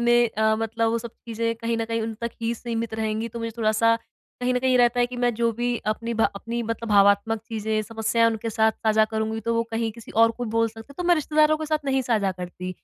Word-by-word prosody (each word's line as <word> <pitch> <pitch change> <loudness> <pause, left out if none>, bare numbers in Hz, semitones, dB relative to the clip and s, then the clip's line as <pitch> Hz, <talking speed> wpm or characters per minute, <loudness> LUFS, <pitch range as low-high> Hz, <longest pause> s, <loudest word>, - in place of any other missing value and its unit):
में 240 0 +4
अ, 220 0 +3
मतलब 225 0 0
वो 230 - 0
सब 235 0 -7 0.2
चीजें 230 0 -1
कहीं 230 0 -2
न 225 - 0
कहीं 230 0 -2
उन 225 0 -3
तक 235 0 -2
ही 230 +1 0
सीमित 230 -1 -4
रहेंगी 220 +1 -2
तो 235 - -7
मुझे 230 0 -3
थोड़ा-सा, 225 +1 +3 0.5
कहीं 250 0 +1
न - - +2
कहीं 255 -1 +4
रहता 240 0 +4
है 245 - +4
कि 250 0 -8
मैं 245 0 +1
जो 235 +1 +1
भी 245 0 0 0.2
अपनी 230 +1 -5
भा 225 - +2 0.2
अपनी 235 +1 -3
मतलब 230 0 -4
भावात्मक 200 +2 +4
चीजें 220 -1 -1
समस्याएँ 225 +1 +1
उनके 225 +1 -3
साथ 220 0 +3
साझा 220 -1 +2
करूँगी, 220 0 -1
तो 230 +2 -1
वो 230 - +2
कहीं 225 0 -1
किसी 230 -1 -12
और 230 - +3
को - - 0
बोल 230 0 +3
सकते 225 0 -12
हैं, - - -22
तो 355 - -2
मैं 350 - +7
रिश्तेदारों 310 0 +3
के 310 - -4
साथ 310 0 +1
नहीं 265 -1 +1
साझा 200 -5 +2
करती। 180 0 -6
230 Hz, 250 wpm, -24 LUFS, 220-235 Hz, 0.5 s, मैं